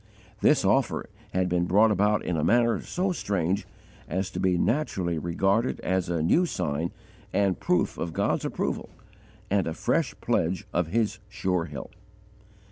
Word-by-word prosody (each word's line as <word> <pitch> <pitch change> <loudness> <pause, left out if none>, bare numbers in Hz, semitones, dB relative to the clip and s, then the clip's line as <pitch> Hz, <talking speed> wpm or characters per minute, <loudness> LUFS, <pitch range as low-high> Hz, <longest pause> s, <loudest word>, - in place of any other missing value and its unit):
This - - +4
offer - - +1 0.2
had 95 0 +1
been 90 -1 +1
brought 105 +5 +5
about 105 +1 +2
in 90 - -1
a 75 - 0
manner 115 +4 +3
so 185 +1 -1
strange 100 - -1 0.4
as 95 +1 -2
to - - -4
be 90 -1 +2
naturally 95 - 0
regarded 95 +8 +1
as 95 -1 0
a 85 -3 0
new 175 - +3
sign 80 - -2 0.4
and 100 -2 +1
proof 90 - +1
of 85 - -2
God's - - 0
approval - - -2 0.6
and 100 -3 +2
a 80 - -3
fresh - - 0
pledge 90 +3 0
of 90 -2 +1
His 110 +4 0
sure 95 -4 -1
help. 70 -4 -8
95 Hz, 155 wpm, -27 LUFS, 85-105 Hz, 0.6 s, brought